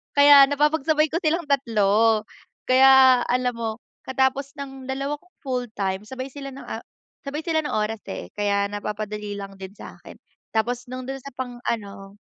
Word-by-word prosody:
Kaya 285 -1 +8
napapagsabay 300 +1 +2
ko 335 - 0
silang 335 0 0
3. 225 -4 +3 0.5
Kaya 260 -1 +7
alam 250 0 +1
mo, 230 -1 -2 0.4
'katapos 265 +1 0
ng 270 -1 -8
2 275 +2 -2
kong 360 +3 -30
full 250 -2 -2
time, 195 0 -2
sabay 260 +2 -6
sila 275 0 -8
ng 275 - -10
a - - -5 0.5
sabay 285 +2 -4
sila 320 -1 0
ng - - -3
oras 215 +1 -1
eh - - -7
kaya 200 -1 +1
napapadali 210 0 -5
lang 195 -1 -8
din 190 0 -9
sa'kin. - - -12 0.4
Tapos 240 +2 -1
'nung 255 +1 -6
do'n 270 +1 -5
sa 275 0 -11
pang-ano 220 -6 -5
255 Hz, 160 wpm, -24 LUFS, 210-275 Hz, 0.5 s, Kaya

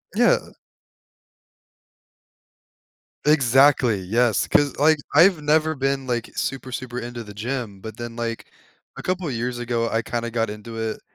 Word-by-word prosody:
Yeah. - - +4 2.9
Exactly. 135 -5 +4
Yes. 110 +3 +1
'Cause, 145 -2 +2
like, 155 +2 +4 0.2
I've 165 +1 +6
never 155 +1 +2
been, 135 0 -1
like, 120 -1 -2
super, 130 -1 -3
super 125 -1 -5
into 120 -1 -6
the 105 -1 -11
gym, 110 -3 -4
but 110 0 -8
then, 120 -1 -6
like, 115 -1 -4 0.5
a - - -7
couple 180 -4 -2
years 120 0 -3
ago, 115 -1 -1
I 115 - 0
kinda 120 0 -3
got 115 -2 0
into 105 +2 -8
it 110 -1 -3
120 Hz, 140 wpm, -23 LUFS, 115-135 Hz, 2.9 s, I've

